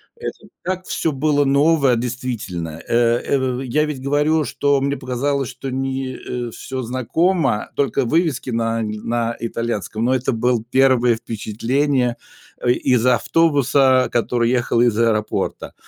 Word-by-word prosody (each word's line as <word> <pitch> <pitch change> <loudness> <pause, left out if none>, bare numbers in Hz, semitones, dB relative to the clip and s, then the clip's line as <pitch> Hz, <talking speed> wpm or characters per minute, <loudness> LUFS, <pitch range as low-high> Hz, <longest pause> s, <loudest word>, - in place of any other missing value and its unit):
это 470 0 -7
и - - -18
так 185 0 -3
всё 160 - -1
было 145 +1 +2
новое, 140 -1 +3
действительно, 115 -10 -4
э, 120 0 +3 0.2
эв 135 - +1 0.2
в - - -4
Я 135 +4 +1
ведь 150 -4 -5
говорю, 150 +3 +2
что 140 0 +1
мне 140 +1 -1
показалось, 130 +1 -2
что 135 - -7
мне, 130 0 -3
э, 120 -1 -5
всё 130 +2 -6
знакомо, 130 - 0
только 140 -1 0
вывески 155 0 0
на 115 0 0
на 115 +2 -2
итальянском, 115 -1 -3
но 130 - +2
это 130 +1 0
был 120 0 +1
1 130 -3 +4
впечатление, 120 +4 -1 0.4
а, 120 - 0
из 125 -1 +2
автобуса, 130 0 +3
который 120 0 +1
ехал 120 -2 +1
из 120 -3 +3
аэропорта, 110 -2 -1
125 Hz, 145 wpm, -20 LUFS, 115-140 Hz, 0.4 s, 1